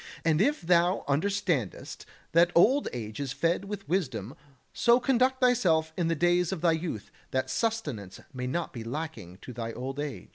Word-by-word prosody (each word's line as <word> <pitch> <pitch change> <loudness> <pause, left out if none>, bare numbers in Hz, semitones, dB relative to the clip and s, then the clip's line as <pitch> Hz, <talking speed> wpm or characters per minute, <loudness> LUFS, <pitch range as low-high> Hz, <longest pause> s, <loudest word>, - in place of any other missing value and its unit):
And 160 0 +3
if 290 +7 +2
thou 175 +1 +2
understandest 155 - -1 0.2
that 170 +1 +5
old 260 +11 +5
age 110 -2 -6
is 135 -3 -3
fed 170 +6 0
with 200 -1 -6
wisdom, 130 - -2 0.4
so 235 +1 +4
conduct 260 +1 +2
thyself 180 -11 +3
in 175 -2 0
the 165 - +1
days 175 +2 +2
of 185 -5 -4
thy 170 -1 +4
youth 160 - -4 0.2
that 130 0 -1
sustenance 145 - -2
may 125 -1 -4
not 170 +6 -3
be 115 - -6
lacking 115 - -6
to 125 - -8
thy 115 -1 -4
old 135 +3 -5
age. 145 -2 -5
165 Hz, 175 wpm, -28 LUFS, 130-195 Hz, 0.4 s, that